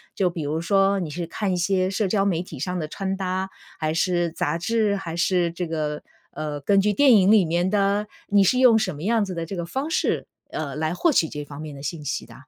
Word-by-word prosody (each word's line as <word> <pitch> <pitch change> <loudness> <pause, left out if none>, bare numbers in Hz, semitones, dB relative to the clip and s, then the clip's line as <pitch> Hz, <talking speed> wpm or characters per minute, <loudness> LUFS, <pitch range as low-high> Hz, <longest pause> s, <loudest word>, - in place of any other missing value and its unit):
就 185 -2 +2
比 170 -3 -5
如 155 +3 -2
说 195 +1 +2
你 170 -4 -3
是 170 +3 -4
看 190 +3 -2
一 180 - 0
些 185 +1 +1
社 200 +1 0
交 195 0 +1
媒 180 -3 0
体 155 -7 -10
上 180 +5 -2
的 155 -3 -3
穿 195 +3 -3
搭， 190 0 -2 0.3
还 155 -1 0
是 175 -1 +1
杂 165 0 -2
志， 215 +1 +1
还 170 -4 -5
是 175 -1 +2
这 170 0 -4
个 150 -2 -3 0.3
呃， 150 -2 -5
根 200 +7 +3
据 205 +1 +2
电 280 0 +5
影 195 0 +5
里 205 -5 +6
面 175 +3 0
的？ 200 +1 +1 0.2
你 200 -1 +4
是 250 +6 +3
用 245 -4 +6
什 190 -8 -1
么 150 - -8
样 225 0 +2
子 190 - -5
的 165 -1 -4
这 190 +2 -6
个 170 - -3
方 270 - -3
式， - - 0 0.3
呃， 145 -3 -4
来 160 +2 -1
获 335 - +2
取 165 - +3
这 150 0 -6
方 145 +1 -9
面 150 -2 -7
的 140 - -10
信 150 0 -5
息 - - -3
的？ - - -15
180 Hz, 270 characters per minute, -24 LUFS, 160-200 Hz, 0.3 s, 里